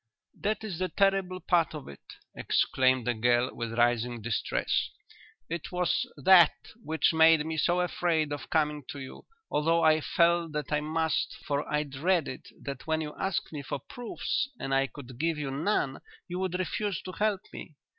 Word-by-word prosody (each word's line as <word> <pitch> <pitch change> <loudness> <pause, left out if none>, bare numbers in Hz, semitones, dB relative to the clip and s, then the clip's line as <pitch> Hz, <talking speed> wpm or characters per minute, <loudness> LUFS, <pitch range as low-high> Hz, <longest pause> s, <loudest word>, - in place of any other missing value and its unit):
"That 215 +1 -2
is 195 -7 -5
the 185 0 -1
terrible 195 -2 +1
part 170 -3 +1
of 150 - -8
it," 70 - -11 0.3
exclaimed 130 -2 +2
the 125 - +1
girl, 120 +2 +2
with 115 -1 -5
rising 120 0 +2
distress. 115 0 -1 0.6
"It 170 +1 -5
was 180 +8 0
that 180 -4 +7 0.3
which 160 +1 +1
made 160 -1 +6
me 160 0 -3
so 175 +3 +2
afraid 165 -4 0
of 145 - -7
coming 150 -2 +1
to 145 - -6
you, 130 -1 -10 0.2
although 165 +3 +2
I 155 0 +5
felt 170 0 +2
that 150 -1 -3
I 150 - +2
must, 160 0 -1
for 145 0 -2
I 150 0 +1
dreaded 150 0 -1 0.2
that 140 0 -6
when 160 0 +1
you 150 -1 -5
asked 190 -4 -2
me 150 - -4
for 140 - -4
proofs 240 - -3
and 135 0 -3
I 135 0 +3
could 130 -3 -11
give 165 0 0
you 145 -3 -3
none 145 -2 -1 0.3
you 180 +1 -4
would 185 -1 -1
refuse 195 +1 -2
to 185 - -6
help 205 0 0
me. 155 - -9
155 Hz, 175 wpm, -29 LUFS, 135-180 Hz, 0.6 s, that